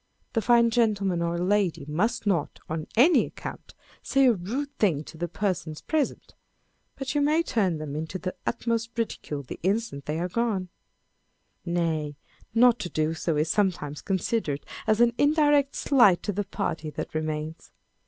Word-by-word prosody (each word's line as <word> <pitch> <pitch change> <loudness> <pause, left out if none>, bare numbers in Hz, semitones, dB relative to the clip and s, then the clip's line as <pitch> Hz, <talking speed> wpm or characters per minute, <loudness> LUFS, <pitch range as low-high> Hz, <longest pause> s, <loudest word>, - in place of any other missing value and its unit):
The 225 - +1
fine 235 +1 +4
gentleman 200 -6 +1
or 170 0 -1
lady 185 -4 +1
must 190 +11 0
not, 175 -8 0
on 155 0 -4
any 310 +9 +6
account, - - -9 0.3
say 275 -1 +3
a 250 - +6
rude 255 +10 -4
thing 165 -9 +2
to 160 - -12
the 175 +2 -3
persons 175 -4 -3
present, 310 -4 -2 0.6
but 270 -1 -4
you 290 - +2
may 305 +3 +3
turn 195 - 0
them 150 -2 -5
into 160 +4 -4
the 185 0 -4
utmost 230 0 -1
ridicule 150 -10 -3
the 130 - -8
instant 195 -6 -1
they 155 +2 -1
are 175 - -1
gone: 195 -2 -1 1.0
nay, 160 -4 -1 0.4
not 240 0 +6
to 175 - -4
do 155 0 0
so 165 -1 -1
is 155 +1 +1
sometimes 175 -8 0
considered 190 -6 -1 0.2
as 215 +1 +3
an 235 0 +5
indirect 290 -1 +3
slight 235 -10 +4
to 205 - -1
the 205 +1 -2
party 165 -5 -3
that - - -6
remains. 155 0 -4
190 Hz, 165 wpm, -26 LUFS, 160-235 Hz, 1.0 s, any